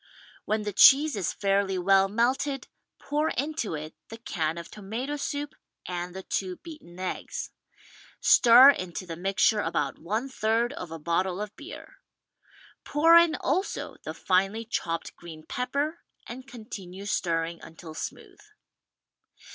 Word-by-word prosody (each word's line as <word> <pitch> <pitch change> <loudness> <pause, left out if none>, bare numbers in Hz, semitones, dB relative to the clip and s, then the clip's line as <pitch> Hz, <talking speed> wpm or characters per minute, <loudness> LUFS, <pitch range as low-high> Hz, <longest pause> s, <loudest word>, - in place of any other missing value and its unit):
When 215 0 0
the 205 -1 -4
cheese 290 +8 +7
is 195 -4 -1
fairly 195 -1 0
well 195 +1 +4
melted, 260 +6 0 0.3
pour 300 +2 -1
into 280 - -2
it 155 +1 -7 0.2
the 225 - -8
can 165 -8 -2
of 170 - -8
tomato 225 +8 -5
soup 290 0 -4 0.3
and 180 0 -5
the 190 - -6
two 185 -1 -2
beaten 305 - -12
eggs. 185 -1 -4 0.7
Stir 250 +3 +8
into 185 -6 -5
the 165 -2 -6
mixture 195 +4 +2
about 145 -8 -1
one 215 +10 -2
third 235 0 0
of 180 - -7
a 165 - -6
bottle 175 +4 -1
of 210 0 -6
beer. 310 +5 -11 0.9
Pour 325 +3 +5
in 340 -1 +6
also 370 +8 -2
the - - -6
finely 195 +4 +1
chopped 165 -7 -3
green 160 -2 -11
pepper 280 - -2 0.3
and 255 +3 -9
continue 200 -6 -9
stirring 170 -3 -1
until 160 0 -11
smooth. 400 - -7
210 Hz, 140 wpm, -27 LUFS, 180-270 Hz, 0.9 s, Stir